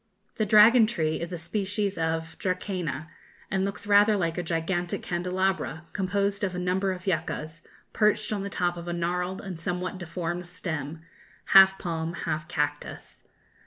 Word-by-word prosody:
The 215 - +1
dragon 220 +2 +7
tree 160 -9 -1
is 170 +1 -4
a 175 - -3
species 200 +3 -1
of 160 0 -2
dracæna, 180 -6 -2 0.5
and 190 0 +1
looks 200 +1 -4
rather 205 +1 +5
like 165 -3 0
a 180 - -1
gigantic 175 +1 -2
candelabra, 180 -2 -1
composed 200 +1 0
of 185 -2 -1
a - - -3
number 185 +2 0
of 185 0 -6
yuccas, 160 -2 -2 0.3
perched 210 0 +2
on 205 - -2
the 200 - -4
top 175 -2 -1
of 170 0 -7
a 175 - -2
gnarled 180 +2 -2
and 180 -4 -7
somewhat 180 +2 -3
deformed 175 0 -4
stem, 160 -3 -5 0.5
half 190 0 +9
palm 165 -2 -3
half 155 -2 -3
cactus. 145 -1 -3
180 Hz, 160 wpm, -27 LUFS, 165-195 Hz, 0.5 s, half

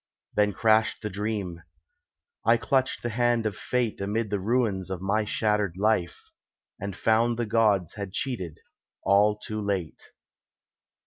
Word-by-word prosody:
Then 105 -1 +2
crashed 110 +2 +2
the 105 - -3
dream. 100 -4 -3 0.8
I 115 +2 +5
clutched 130 +2 0
the 120 - -1
hand 120 0 +1
of 105 -2 -1
Fate 120 -2 -1
Amid 105 +2 -1
the 100 - 0
ruins 105 -3 0
of 95 -2 -3
my 105 +3 0
shattered 105 -4 0
life, 100 -4 0 0.5
And 100 -1 -5
found 115 +2 +2
the 120 - 0
Gods 105 -6 +2
had 100 -2 -6
cheated, 95 - -4 0.4
all 105 +1 +4
too 110 0 -5
late. 95 -6 -2
105 Hz, 140 wpm, -27 LUFS, 100-115 Hz, 0.8 s, I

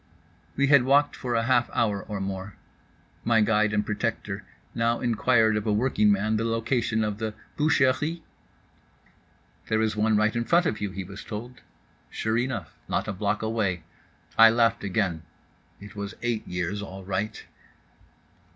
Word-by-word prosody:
We 140 - +3
had 140 -1 +6
walked 140 +3 +3
for 125 -2 -3
a 115 - +2
half 120 0 +2
hour 105 -4 +1
or 105 -2 -5
more. 95 0 -5 0.7
My 115 -1 +3
guide 105 0 +3
and 105 -1 0
protector 105 -2 -3 0.3
now 115 0 +1
inquired 115 -2 +3
of 105 0 -2
a - - +2
workingman 105 -2 +2
the 115 - -1
location 115 0 0
of 105 -1 -3
the 110 -1 -3 0.2
boucheries? 150 +2 +2 1.5
"There 110 - +1
is 110 -1 0
one 110 0 +2
right 110 +2 +2
in 120 - 0
front 175 +5 +3
of 110 - -1
you," 100 - -1
he 95 0 -5
was 95 +2 -9
told. 115 +3 -8 0.5
Sure 110 +1 -1
enough, 120 - -3
not - - -1
a 105 - -2
block 100 +3 -1
away. 110 -6 -1 0.6
I 115 0 +10
laughed 115 -1 +2
again. 95 -4 -1 0.6
It 105 +1 -12
was 100 +1 -5
eight 120 -2 -2
years 90 +3 -3
all 95 -1 -8
right. 100 +3 -3
110 Hz, 160 wpm, -26 LUFS, 105-120 Hz, 1.5 s, I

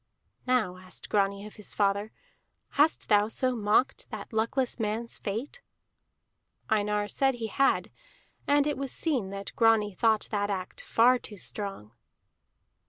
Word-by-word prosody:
"Now," 220 -8 +1
asked 185 0 -8
Grani 200 0 +1
of 215 - -11
his 210 - -8
father, 200 +1 +1 0.6
"hast 300 +3 +2
thou 210 -1 +4
so 255 +3 0
mocked 220 +4 +1
that - - -8
luckless 240 +4 0
man's 225 +2 -2
fate?" 235 - -4 1.1
Einar 210 -1 +1
said 270 +4 +1
he 235 -2 -4
had, 270 +5 +1 0.6
and 285 0 +4
it 295 -2 -1
was 275 -1 -3
seen 260 - -1
that 195 0 -7
Grani 225 -3 +4
thought 220 +2 +2
that 205 -1 0
act 185 -2 -4
far 245 +2 +4
too 210 - -9
strong. 195 - -6
215 Hz, 140 wpm, -28 LUFS, 205-250 Hz, 1.1 s, thou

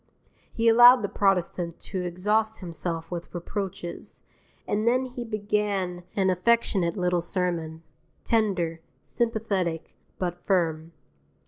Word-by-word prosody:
He 230 0 0
allowed 240 +1 +8
the - - +1
protestant 180 -4 0
to 190 -2 -4
exhaust 210 +5 0
himself 165 -1 -5
with 175 -1 -5
reproaches, 175 -1 -6 0.4
and 215 +2 0
then 255 +2 +3
he 250 -1 -6
began 205 -4 -1
an 190 -2 +2
affectionate 185 -2 +1
little 180 -1 +1
sermon, 170 -2 -3 0.4
tender, 185 -8 0 0.2
sympathetic, 205 -8 -2 0.2
but 175 -1 -3
firm. 165 -4 0
185 Hz, 110 wpm, -26 LUFS, 170-215 Hz, 0.4 s, allowed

